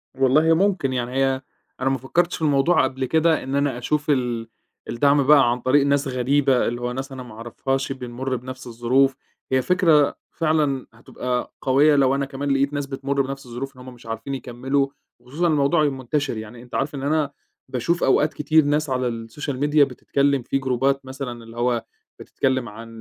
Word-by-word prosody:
والله 140 Hz, +5 st, +4 dB
ممكن 180 Hz, -7 st, +1 dB
يعني 125 Hz, -1 st, -2 dB
هي 135 Hz, 0 st, +1 dB, 0.4 s
أنا 135 Hz, -, +2 dB
ما 135 Hz, -, 0 dB
فكرتش 170 Hz, +8 st, 0 dB
في -, -, -9 dB
الموضوع 150 Hz, +2 st, +3 dB
قبل 130 Hz, 0 st, -1 dB
كده، 160 Hz, +4 st, +2 dB
إن 135 Hz, +1 st, -3 dB
أنا 140 Hz, -3 st, 0 dB
أشوف 150 Hz, +4 st, -2 dB
ال 120 Hz, -5 st, 0 dB, 0.4 s
الدعم 140 Hz, +3 st, +3 dB
بقى 140 Hz, -5 st, +6 dB
عن 120 Hz, -, -1 dB
طريق 140 Hz, +3 st, +3 dB
ناس 140 Hz, 0 st, +1 dB
غريبة، 130 Hz, +1 st, +2 dB
اللي 120 Hz, +1 st, -3 dB
هو 120 Hz, 0 st, -2 dB
ناس 135 Hz, +2 st, -5 dB
أنا 130 Hz, -1 st, -7 dB
ما 120 Hz, -, -12 dB
أعرفهاش 135 Hz, +4 st, -3 dB
بنمُر 130 Hz, 0 st, -4 dB
بنفس 130 Hz, +1 st, -8 dB
الظروف، 125 Hz, +3 st, +2 dB, 0.4 s
هي 130 Hz, 0 st, +3 dB
فكرة، 165 Hz, -5 st, +3 dB, 0.2 s
فعلًا 155 Hz, -5 st, 0 dB
هتبقى 125 Hz, +2 st, -4 dB
قوية 140 Hz, +3 st, +4 dB
لو 135 Hz, -1 st, +3 dB
أنا 140 Hz, 0 st, -1 dB
كمان 140 Hz, +1 st, -4 dB
لقيت 140 Hz, +1 st, +1 dB
ناس 145 Hz, -1 st, -2 dB
بتمُر 140 Hz, 0 st, -1 dB
بنفس 135 Hz, 0 st, -5 dB
الظروف، 130 Hz, +3 st, -6 dB
إن 125 Hz, -, -13 dB
هُم 130 Hz, 0 st, -10 dB
مش 120 Hz, -1 st, -17 dB
عارفين 115 Hz, +4 st, -5 dB
يكملّوا، 135 Hz, +2 st, -1 dB, 0.3 s
وخصوصًا 145 Hz, +8 st, -2 dB
الموضوع 155 Hz, +1 st, +3 dB
يبقى 140 Hz, -3 st, 0 dB
منتشر 130 Hz, -1 st, -2 dB
يعني، 110 Hz, +2 st, -8 dB
أنت 125 Hz, -, -10 dB
عارف 140 Hz, +2 st, -1 dB
إن 135 Hz, -, -5 dB
أنا 150 Hz, 0 st, +1 dB, 0.4 s
باشوف 140 Hz, +7 st, -1 dB
أوقات 150 Hz, +3 st, +3 dB
كتير 155 Hz, +2 st, +3 dB
ناس 150 Hz, +1 st, +1 dB
على 120 Hz, -3 st, -2 dB
الsocial 145 Hz, +2 st, -4 dB
media 150 Hz, +1 st, +3 dB
بتتكلم 140 Hz, +2 st, 0 dB
في 130 Hz, -, -1 dB
جروبات 135 Hz, +1 st, 0 dB
مثلًا 130 Hz, -3 st, -6 dB
اللي 115 Hz, +1 st, -13 dB
هو 120 Hz, -1 st, 0 dB, 0.4 s
بتتكلم 130 Hz, -3 st, -1 dB
عن 115 Hz, +2 st, -10 dB
135 Hz, 190 wpm, -23 LUFS, 125-145 Hz, 0.4 s, بقى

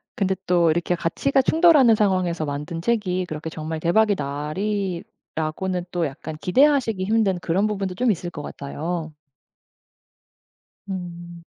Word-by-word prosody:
근데 190 Hz, -1 st, +1 dB
또 175 Hz, -2 st, +4 dB
이렇게 175 Hz, +2 st, 0 dB
가치가 270 Hz, +12 st, +1 dB
충돌하는 300 Hz, -6 st, +5 dB
상황에서 185 Hz, -6 st, +1 dB
만든 150 Hz, +3 st, -4 dB
책이 185 Hz, -3 st, 0 dB
그렇게 160 Hz, -1 st, -5 dB
정말 160 Hz, 0 st, -5 dB
대박이 205 Hz, +6 st, +3 dB
나리라고는 175 Hz, +2 st, -3 dB
또 175 Hz, -2 st, 0 dB
약간 155 Hz, +2 st, -6 dB
기대하시기 245 Hz, -3 st, +3 dB
힘든 205 Hz, -3 st, +2 dB
그런 185 Hz, +5 st, +1 dB
부분도 195 Hz, -3 st, -3 dB
좀 240 Hz, +3 st, +2 dB
있을 175 Hz, -1 st, -3 dB
것 150 Hz, -, -7 dB
같아요. 155 Hz, +3 st, -5 dB, 1.8 s
음. 175 Hz, -2 st, -7 dB
180 Hz, 295 characters per minute, -23 LUFS, 165-205 Hz, 1.8 s, 충돌하는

